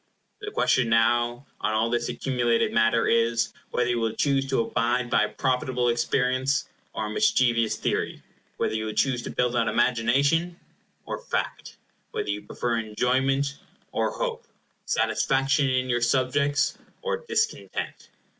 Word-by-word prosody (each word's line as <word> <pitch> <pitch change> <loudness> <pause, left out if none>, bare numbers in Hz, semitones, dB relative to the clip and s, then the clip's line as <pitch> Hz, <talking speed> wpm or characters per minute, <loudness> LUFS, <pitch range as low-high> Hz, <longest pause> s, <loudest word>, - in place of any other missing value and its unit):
The 415 0 -5
question 130 - +2
now, 120 +3 +2
on 110 - 0
all 115 +1 +1
this 120 -1 0
accumulated 120 -3 0
matter, 115 +1 +3
is: 115 0 +2 0.2
whether 125 - 0
you 120 -1 +1
will 115 -1 -1
choose 135 +1 +1
to 130 - +2
abide 120 +2 0
by 105 - +4
a - - -5
profitable 125 -2 0
experience, 130 +3 +1 0.3
or 110 - -2
a - - -4
mischievous 120 - +2
theory; - - -2 0.3
whether - - 0
you 110 0 -2
choose 125 +2 +1
to - - -6
build 125 0 0
on 115 -2 +2
imagination, 140 +10 +2 0.5
or - - -4
fact; - - -4 0.4
whether - - -3
you 105 0 -3
prefer 115 +3 -2
enjoyment, 130 +6 0 0.3
or - - 0
hope; 480 -1 -4 0.4
satisfaction 135 +1 +2
in 130 0 +1
your 120 -1 0
subjects, 135 +4 +1 0.2
or 480 -1 -1
discontent? 450 -1 -3
125 Hz, 145 wpm, -26 LUFS, 115-135 Hz, 0.5 s, by